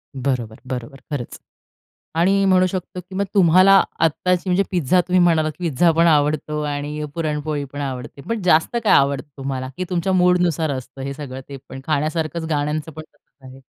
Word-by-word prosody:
बरोबर, 125 -4 -2
बरोबर, 130 +2 -6
खरंच. 135 -5 -5 0.8
आणि 195 +4 +3
म्हणू 185 -1 +4
शकतो 185 0 -5
की 180 +1 -14
मग 200 - 0
तुम्हाला 185 +1 +6 0.2
आत्ताची, 175 +3 +1
म्हणजे 180 +2 +3
पिझ्झा 180 0 +2
तुम्ही 180 +1 +1
म्हणालात, 160 -3 +3
की 175 -2 -1
पिझ्झा 165 +4 +3
पण 165 +1 +3
आवडतो 150 0 +1
आणि 150 +1 -3
पुरणपोळी 150 -2 -2
पण 145 - -6
आवडते, 135 0 -5
पण 230 -4 -2
जास्त 170 +6 +3
काय - - +4
आवडतं 140 +1 +3
तुम्हाला? 135 -1 -4
की 185 - -2
तुमच्या 180 +2 0
मूडनुसार 180 -3 +2
असतं 130 +1 -9
हे 140 +1 -4
सगळं 135 -2 -7
ते 140 - -7
पण, 135 - -8
खाण्यासारखच 155 +2 -1
गाण्यांचं 150 +1 -2
पण 155 - -8
तसंच 150 -2 -27
आहे. 130 - -12
155 Hz, 175 wpm, -21 LUFS, 140-180 Hz, 0.8 s, तुम्हाला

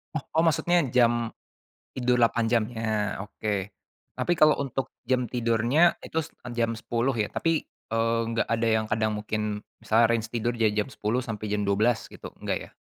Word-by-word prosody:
Oh, 140 - -2
oh, 160 - +4
maksudnya 165 +2 +3
jam 120 -2 +3 0.6
tidur 125 -1 +1
8 115 0 +3
jam 120 -2 +4
nya? 110 -3 -2
Oke. 105 -1 -3 0.5
Tapi, 175 - +1
kalau 155 -1 +5
untuk 135 -1 -3 0.2
jam 125 -2 0
tidurnya 120 +7 +3
itu 160 - -3 0.4
jam 115 0 +1
10 120 +3 -1
ya, 110 -3 -1
tapi, 165 -1 0 0.3
eee, 115 0 +2
enggak 115 0 0
ada 115 0 +1
yang 110 -1 +2
kadang 110 0 +1
mungkin 105 0 -3 0.2
misalnya 115 +1 +3
range 115 -1 +1
tidur 120 +1 0
dari 110 -2 +2
jam 105 +5 -1
10, 115 +3 -1
sampai 110 -3 -5
jam 105 - 0
12, 105 +3 +1
gitu, - - -10
enggak, - - -1
ya? - - -32
115 Hz, 170 wpm, -27 LUFS, 110-125 Hz, 0.6 s, kalau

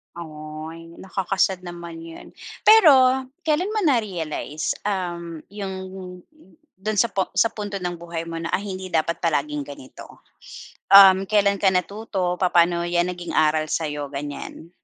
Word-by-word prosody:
Ay, 155 0 -9
nakaka-sad 190 -1 -1
naman 170 -1 -8
'yan. 165 0 -11 0.4
Pero, 265 -11 +6 0.2
kailan 350 +7 0
mo 430 - 0
na 290 -7 +4
realize, 160 -6 -4 0.2
um, 170 -4 -4
'yung 200 -2 -5 1.0
do'n 210 +3 -3
sa 235 - +3
pu 195 -2 0
sa 230 - +3
punto 205 -3 -5
ng 175 -1 -3
buhay 170 -1 -6
mo 165 - -5
na, 165 0 -5
ay 200 +2 -1
hindi 185 0 -6
dapat 165 +1 +1
palaging 150 -3 -1
ganito? 140 -2 -12 0.7
Um, 195 -1 +9
kailan 200 -1 +2
ka 195 - +4
natuto, 185 -1 -2
papaano 175 -1 +3
'yan 175 +1 +1
naging 175 -1 -7
aral 155 0 +2
sa'yo, 150 -3 -2
ganiyan? 145 +3 -7
175 Hz, 140 wpm, -23 LUFS, 165-200 Hz, 1.0 s, Um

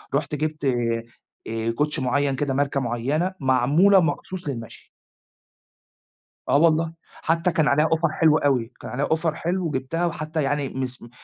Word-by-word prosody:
رُحت 145 +1 -1
جِبت 155 0 -3 0.8
آآ، 115 0 -2
كوتشي 150 +1 0
معيّن 140 +2 +1
كده، 140 0 -1
ماركة 140 +1 0
معينة، 135 +9 -1
معمولة 140 +10 +4
مخصوص 175 +2 -2
للمشي. 115 -5 -7 1.6
آه - - +5
والله، 165 +1 +3 0.3
حتى 165 +2 +1
كان 160 -2 +2
عليها 150 +2 +3
offer 165 -1 0
حلو 155 -1 +4
أوي، 130 -6 +1
كان - - -8
عليها 135 +4 -1
offer 160 0 0
حلو 175 +3 -2
وجِبتها 150 +4 -2
وحتى 155 -2 -2
يعني 140 0 -1
مسم 130 -2 -5
150 Hz, 145 wpm, -24 LUFS, 135-165 Hz, 1.6 s, آه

